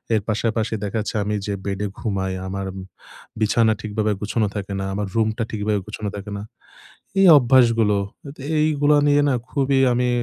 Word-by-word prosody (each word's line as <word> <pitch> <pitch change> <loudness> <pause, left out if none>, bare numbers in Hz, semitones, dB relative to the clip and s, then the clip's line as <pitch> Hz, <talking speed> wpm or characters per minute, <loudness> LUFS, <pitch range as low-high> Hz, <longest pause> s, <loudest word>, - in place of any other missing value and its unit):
এর 110 - +1
পাশাপাশি 110 +1 -1
দেখা 105 +2 -2
যাচ্ছে 105 - -5
আমি 105 +1 -1
যে 100 - -1
বেডে 100 +1 -2
ঘুমাই, 95 -4 -2
আমার 95 +1 -4 0.8
বিছানা 110 +1 +3
ঠিকভাবে 105 0 -1
গুছানো 110 +1 0
থাকে 100 -1 -4
না। 95 - -3
আমার 105 0 -2
রুমটা 110 +1 +1
ঠিকভাবে 105 -1 -1
গুছানো 105 -1 -5
থাকে 100 +1 -7
না। - - -6 0.8
এই 195 - +6
অভ্যাসগুলো 115 -5 +4 0.3
আত 140 - -10 0.2
এইগুলো 150 -1 +3
নিয়ে 145 0 +4
না, - - +2 0.2
খুবই 135 -1 +1
আমি 125 0 +1
110 Hz, 165 wpm, -22 LUFS, 105-120 Hz, 0.8 s, এই